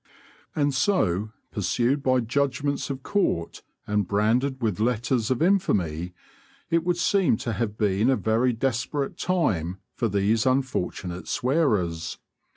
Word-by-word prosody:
And 145 -1 +1
so, 110 - +1 0.2
pursued 120 +8 0
by 130 -2 +2
judgments 140 +4 -1
of 135 -1 -5
court 185 - -1 0.2
and 105 -2 0
branded 120 +7 +1
with 110 -5 -1
letters 120 0 0
of 130 +4 +1
infamy, 90 - +1 0.6
it 165 0 +3
would 175 0 0
seem 175 - +2
to 115 - -3
have 110 -3 -2
been 105 +2 +2
a 135 - +4
very 115 +2 +1
desperate 135 +4 -2
time 95 - 0 0.2
for 115 - -1
these 105 +3 +1
unfortunate 100 -9 -1
swearers. 110 - 0
120 Hz, 130 wpm, -25 LUFS, 105-140 Hz, 0.6 s, a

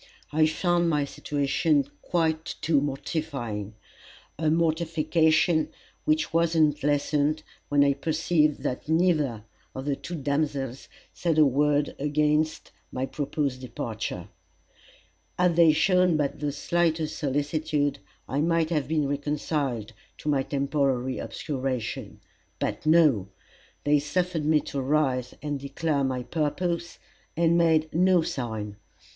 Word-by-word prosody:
I 155 +1 +4
found 175 +1 +1
my 150 -3 +1
situation 145 +1 0
quite 160 -2 -1
too 155 -3 +3
mortifying 135 -7 -4 0.6
a 155 +1 0
mortification 160 0 +2 0.4
which 155 +1 +1
was 165 0 +2
not 150 -2 +3
lessened, 145 +1 +1 0.3
when 145 -1 +4
I 140 0 +4
perceived 155 +1 +1
that 130 - -3
neither 155 - +2 0.3
of 130 - -5
the 145 -1 0
two 175 - -7
damsels 140 -3 -2 0.3
said 165 -3 0
a 155 - +7
word 145 +2 +2
against 150 +2 0 0.2
my 130 +1 -2
proposed 140 -2 -2
departure. 115 -3 -5 1.1
Had 180 -2 +3
they 165 -2 +7
shown 180 +2 +3
but 145 -2 -1
the 145 0 -1
slightest 160 +1 0
solicitude, 145 +1 0 0.3
I 135 +4 -1
might 165 0 +1
have 150 -5 0
been 150 -2 +1
reconciled 140 -5 -2 0.2
to 150 - -4
my 140 -2 +2
temporary 135 -2 0
obscuration. 130 -5 -4 0.4
But - - -3
no! 155 - +4 0.6
they 145 0 +4
suffered 165 +2 -1
me 155 -1 +4
to 140 - -4
rise 130 -3 0
and 145 -2 -2
declare 140 +1 -1
my 130 -2 -1
purpose, 170 +4 -2 0.4
and 170 0 +3
made 160 -2 +3
no 180 +1 +4
sign. 110 -7 -4
150 Hz, 125 wpm, -26 LUFS, 140-160 Hz, 1.1 s, a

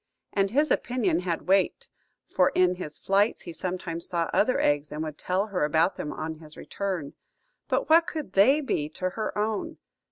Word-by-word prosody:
And 195 -1 +2
his 295 +7 +2
opinion 210 -10 +1
had 175 -2 -3
weight, 190 0 +2 0.4
for 180 - +2
in 180 -1 +4
his 150 -5 -7
flights 200 +3 +1
he 170 - -7
sometimes 170 -2 -3
saw 170 -2 -1
other 255 +5 +3
eggs, 145 0 +1
and 150 +1 -3
would 155 -2 -5
tell 185 +3 0
her 195 -7 -2
about 160 +5 +2
them 150 - -5
on 155 0 -5
his 155 -1 -14
return. 185 -8 -4 0.5
But - - 0
what 330 +2 +5
could 310 - -5
they 260 +11 +5
be 150 - -1
to 185 0 -1
her 215 +1 -4
own? 210 0 -2
185 Hz, 185 wpm, -27 LUFS, 160-210 Hz, 0.5 s, what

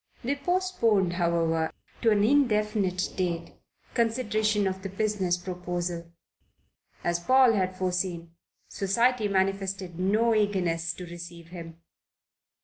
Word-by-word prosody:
They 260 +4 +1
postponed, 280 - +1
however, 165 -2 +1 0.3
to 230 - +4
an 205 -2 +3
indefinite 210 -7 +2
date, 170 -3 -2 0.4
consideration 215 -3 +1
of 190 0 -2
the 195 - -5
business 195 -3 0
proposal. 175 -1 -4 0.9
As 175 0 0
Paul 255 +5 +5
had 185 -3 0
foreseen, 180 -2 -2 0.4
Society 230 +3 +1
manifested 195 -2 -1
no 215 +5 +3
eagerness 180 -6 +1
to 180 - -8
receive 170 -1 -10
him. 170 -2 -10
190 Hz, 110 wpm, -27 LUFS, 175-215 Hz, 0.9 s, Paul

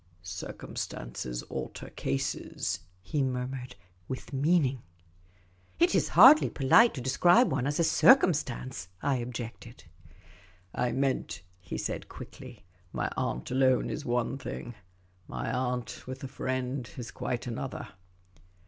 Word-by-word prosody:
" 85 +1 -32 0.2
Circumstances - - -5
alter - - -6
cases," 70 0 -2 0.2
he 145 +9 -1
murmured, 125 -1 -3 0.3
with 130 +1 -6
meaning. 140 -3 +2 1.0
"It 170 - +4
is 185 - +3
hardly 260 - +9
polite 180 - +5
to 130 - -4
describe 175 - +4
one 125 - 0
as 145 +2 -1
a - - +4
circumstance," 145 - +3 0.2
I 140 -2 +2
objected. 120 0 -7 0.5
" 90 0 -25 0.2
I 125 -1 0
meant," 135 -7 -1 0.2
he 90 -1 -6
said, - - -4
quickly, 125 -7 -11
" 90 -1 -33
my - - -2
aunt 60 - -2
alone 130 -1 +3
is 150 - -4
one 120 +1 -1
thing; 120 -2 -6 0.5
my - - -3
aunt 125 -1 -3
with 130 +1 -7
a - - -3
friend 130 -1 -3
is 120 -3 -6
quite 120 - -3
another." 125 +2 -5
130 Hz, 130 wpm, -29 LUFS, 120-140 Hz, 1.0 s, hardly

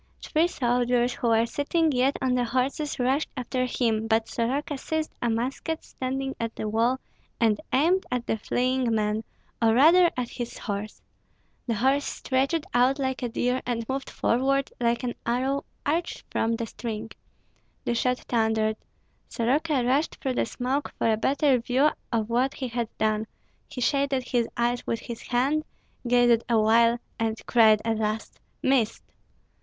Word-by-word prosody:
Three 325 +2 +2
soldiers 245 -4 +1
who 240 - -2
were 225 0 +4
sitting 310 +6 +1
yet 260 +1 +2
on 255 -1 +2
the 250 -1 +2
horses 260 +5 -1
rushed 265 +4 +1
after 255 0 -1
him; 225 -3 0
but 225 0 +2
Soroka 270 +6 -1
seized 315 +3 -3
a 240 - +1
musket 260 +8 -2
standing 270 +1 -4
at 230 -1 -3
the 215 - -3
wall, 230 +4 +1 0.4
and 225 0 +2
aimed 340 +8 +2
at 250 -1 -2
the - - 0
fleeing 250 +1 0
man, 215 0 0 0.4
or 225 -1 +4
rather 340 +7 +7
at 245 -1 -2
his 240 -1 -6
horse. 205 0 -5 0.6
The 230 - 0
horse 265 +5 +2
stretched 275 +4 -1
out 250 +3 +4
like 265 -2 -2
a 245 - -1
deer, 250 +2 0
and 230 -2 -3
moved 270 +1 -3
forward 275 +3 +1
like 235 0 +1
an 245 -1 -1
arrow 260 +4 0 0.2
urged 330 +4 -1
from 230 +1 +1
the 230 0 -3
string. 225 -1 -6 0.7
The - - +1
shot 250 +1 +1
thundered. 220 -2 +1 0.5
Soroka 270 +3 +1
rushed 275 +6 +1
through 265 - -2
the - - 0
smoke 260 +5 -2
for 225 - +2
a - - +3
better 270 +3 +2
view 260 +6 +2 0.2
of 225 -3 0
what 250 +4 +1
he 260 -2 -4
had 235 -1 -2
done; 215 0 0 0.4
he 250 - -7
shaded 275 0 +1
his 240 -2 0
eyes 240 +1 0
with 230 - -1
his 235 -1 -7
hand, 270 +5 +1 0.4
gazed 240 -1 +4
awhile, 230 +1 +4 0.2
and 225 0 -1
cried 220 -3 +5
at 225 -1 0
last, 215 0 -3 0.2
"Missed!" 260 -5 +1
245 Hz, 160 wpm, -26 LUFS, 230-270 Hz, 0.7 s, rather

